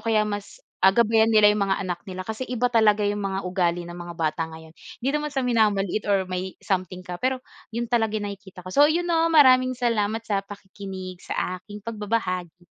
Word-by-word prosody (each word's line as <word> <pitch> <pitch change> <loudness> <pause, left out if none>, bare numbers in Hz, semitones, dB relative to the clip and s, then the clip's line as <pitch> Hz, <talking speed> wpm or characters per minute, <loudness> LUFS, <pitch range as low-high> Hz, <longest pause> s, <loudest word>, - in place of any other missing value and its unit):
kaya 220 -2 +2
mas, 205 -1 -5 0.2
ah, 190 +1 +6
gabayan 225 -1 +4
nila 215 -2 +6
yung 210 - -1
mga 195 - +2
anak 175 -1 -3
nila, 185 0 -5
kasi 220 +5 -5
iba 245 0 0
talaga 215 -2 +4
yung 205 0 0
mga 195 -1 -2
ugali 175 -1 0
ng 175 0 -9
mga 175 0 -7
bata 160 0 -1
ngayon. 160 0 -12 0.3
Hindi 270 - +2
naman 300 0 -1
sa 270 -2 -1
minamaliit, 215 -4 +1
or 195 -2 +3
may 185 0 -5
something 185 -2 -2
ka, 180 -1 -7
pero 260 +1 +1 0.3
iyon 235 +1 -3
talaga 225 -2 +1
ang 205 -1 -3
nakikita 190 -3 -12
ko. 185 - -7
So, 290 +5 +6
ayun, 340 +3 +1
'no, 330 -1 +2
maraming 255 -5 +5
salamat 225 -2 0
sa 200 -3 0
pakikinig 190 -2 -9
sa 185 0 -3
aking 205 +2 -11
pagbabahagi. 190 -6 -3
205 Hz, 200 wpm, -24 LUFS, 185-230 Hz, 0.3 s, ah